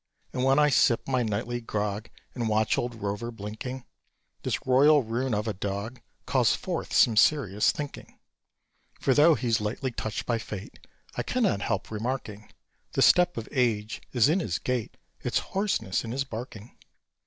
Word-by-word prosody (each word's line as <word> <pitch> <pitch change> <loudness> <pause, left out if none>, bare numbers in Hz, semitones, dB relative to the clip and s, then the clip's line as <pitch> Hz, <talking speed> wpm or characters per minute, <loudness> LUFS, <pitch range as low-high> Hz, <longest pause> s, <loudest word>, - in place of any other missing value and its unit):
And 125 - -1
when 135 +1 +4
I 150 0 +5
sip 120 -3 +3
my 130 -2 +1
nightly 115 +2 -2
grog, 105 -1 -3 0.2
And 120 -3 -2
watch 110 0 +2
old 120 -1 -2
Rover 105 +2 -3
blinking, 115 +4 -7 0.6
This - - -2
royal 140 +3 +5
ruin 120 +2 -1
of 105 +2 -2
a 110 - -1
dog 100 +5 -4 0.2
Calls - - +3
forth - - -4
some 115 - +5
serious 105 -4 +3
thinking. 145 -2 -8 0.8
For, 135 - +2
though 150 +4 +6
he's 115 -4 0
lightly 120 +5 -2
touched 110 -2 -4
by 115 -2 0
Fate, 105 -2 -8 0.4
I - - -1
cannot - - 0
help - - -2
remarking 110 -2 -4 0.4
The - - +3
step 180 -4 +5
of 115 - -4
age 115 -4 0
is 120 -2 +4
in 165 +6 +2
his 90 - -1
gait, 125 -3 -3 0.2
Its - - -1
hoarseness 195 - -1
in 115 0 -5
his 135 +2 0
barking. 115 -3 -8
115 Hz, 165 wpm, -27 LUFS, 105-130 Hz, 0.8 s, though